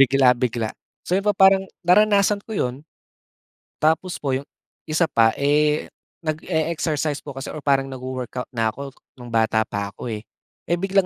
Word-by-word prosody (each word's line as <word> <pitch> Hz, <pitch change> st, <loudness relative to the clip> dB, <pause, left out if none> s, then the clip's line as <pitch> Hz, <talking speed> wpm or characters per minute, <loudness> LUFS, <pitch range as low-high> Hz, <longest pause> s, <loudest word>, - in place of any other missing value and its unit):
bigla-bigla. 125 Hz, -4 st, +3 dB, 0.3 s
So 180 Hz, -, +1 dB
yun -, -, -11 dB
po 205 Hz, -, +2 dB
pa 190 Hz, 0 st, +8 dB
parang 190 Hz, 0 st, +1 dB, 0.2 s
naranasan 205 Hz, +2 st, +4 dB
ko 220 Hz, -2 st, -6 dB
yun. 125 Hz, +4 st, -2 dB, 0.9 s
Tapos 160 Hz, +4 st, +1 dB
po 135 Hz, -2 st, -2 dB
iyong 135 Hz, +2 st, -2 dB, 0.4 s
isa 155 Hz, +2 st, +3 dB
pa 115 Hz, -6 st, +3 dB
eh, 150 Hz, +1 st, +2 dB, 0.4 s
nage-exercise 155 Hz, -2 st, -1 dB
po 140 Hz, -, -8 dB
kasi 135 Hz, -, -5 dB
or 155 Hz, -, -6 dB
parang 135 Hz, -1 st, +2 dB
nag-wo-workout 130 Hz, -1 st, -5 dB
na 115 Hz, -2 st, 0 dB
ako 140 Hz, +1 st, -7 dB, 0.3 s
nung 120 Hz, -1 st, -10 dB
bata 110 Hz, -1 st, +2 dB
pa 100 Hz, -1 st, -3 dB
ako 120 Hz, -, -7 dB
eh. 105 Hz, +1 st, -7 dB, 0.4 s
Eh, 175 Hz, -, +2 dB
biglang 195 Hz, +1 st, +2 dB
140 Hz, 165 wpm, -22 LUFS, 125-170 Hz, 0.9 s, pa